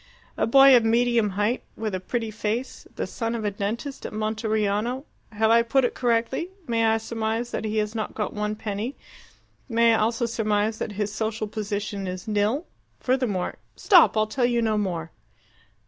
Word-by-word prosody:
A -, -, 0 dB
boy 270 Hz, +2 st, +8 dB
of 240 Hz, -, +5 dB
medium 230 Hz, -1 st, +3 dB
height 210 Hz, +4 st, +1 dB, 0.2 s
with 215 Hz, -2 st, -3 dB
a 185 Hz, -, -1 dB
pretty 225 Hz, +4 st, -3 dB
face, 220 Hz, +4 st, -3 dB
the -, -, -2 dB
son 230 Hz, 0 st, -3 dB
of 220 Hz, -2 st, -3 dB
a 205 Hz, -, +1 dB
dentist 220 Hz, +8 st, -4 dB
at -, -, -5 dB
Monteriano. 215 Hz, +3 st, -1 dB, 0.3 s
Have 220 Hz, +1 st, +2 dB
I 230 Hz, 0 st, +6 dB
put 250 Hz, +3 st, +2 dB
it -, -, -1 dB
correctly? 240 Hz, +7 st, 0 dB, 0.2 s
May 230 Hz, -3 st, +1 dB
I 220 Hz, 0 st, +3 dB
surmise 225 Hz, +1 st, -3 dB
that -, -, -3 dB
he 215 Hz, 0 st, -2 dB
has 210 Hz, 0 st, 0 dB
not 220 Hz, -2 st, -4 dB
got 210 Hz, -, -2 dB
one 210 Hz, 0 st, -2 dB
penny? 215 Hz, +4 st, -4 dB, 0.7 s
May 230 Hz, 0 st, +4 dB
I 225 Hz, -, +2 dB
also 230 Hz, +2 st, +1 dB
surmise 215 Hz, -1 st, 0 dB
that 210 Hz, -, -4 dB
his 205 Hz, 0 st, -2 dB
social 220 Hz, 0 st, -2 dB
position 205 Hz, -2 st, -4 dB
is 185 Hz, +3 st, -6 dB
nil? 215 Hz, +9 st, 0 dB, 0.3 s
Furthermore 250 Hz, -8 st, -1 dB
" -, -, -41 dB
"Stop! 355 Hz, -, +5 dB
I'll 215 Hz, -, +4 dB
tell 245 Hz, +3 st, 0 dB
you 240 Hz, -1 st, +1 dB
no 220 Hz, -2 st, +1 dB
more." 175 Hz, -6 st, -2 dB
220 Hz, 185 wpm, -25 LUFS, 210-235 Hz, 0.7 s, boy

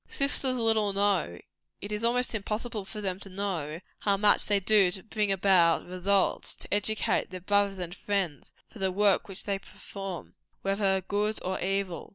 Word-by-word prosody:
Sisters 275 Hz, -2 st, +2 dB
little 220 Hz, -4 st, +2 dB
know 195 Hz, -, +1 dB, 0.4 s
it 205 Hz, -, -7 dB
is 210 Hz, +1 st, -3 dB
almost 245 Hz, +2 st, +2 dB
impossible 215 Hz, 0 st, -3 dB
for 205 Hz, +3 st, -7 dB
them 190 Hz, -2 st, -2 dB
ever -, -, -18 dB
to 195 Hz, -, -7 dB
know 180 Hz, -6 st, -3 dB, 0.2 s
how 200 Hz, -1 st, +2 dB
much 205 Hz, +1 st, +4 dB
they 205 Hz, -1 st, +3 dB
do 195 Hz, -1 st, +4 dB
to 185 Hz, +1 st, -4 dB
bring 210 Hz, -2 st, -1 dB
about 180 Hz, -3 st, +4 dB
results, 185 Hz, +2 st, 0 dB
to -, -, -6 dB
educate 210 Hz, +1 st, +1 dB
their 185 Hz, -1 st, -7 dB
brothers 200 Hz, +1 st, +1 dB
and 175 Hz, -1 st, -4 dB
friends, 195 Hz, -6 st, -2 dB, 0.2 s
for 225 Hz, -, -14 dB
the 190 Hz, -1 st, 0 dB
work 200 Hz, +1 st, +3 dB
which 195 Hz, -1 st, -6 dB
they 200 Hz, -1 st, -2 dB
perform, 195 Hz, -2 st, -8 dB, 0.3 s
whether 195 Hz, -1 st, +1 dB
good 210 Hz, +3 st, -1 dB
or 185 Hz, +1 st, -2 dB
evil. 195 Hz, -2 st, -2 dB
200 Hz, 180 wpm, -28 LUFS, 185-210 Hz, 0.4 s, much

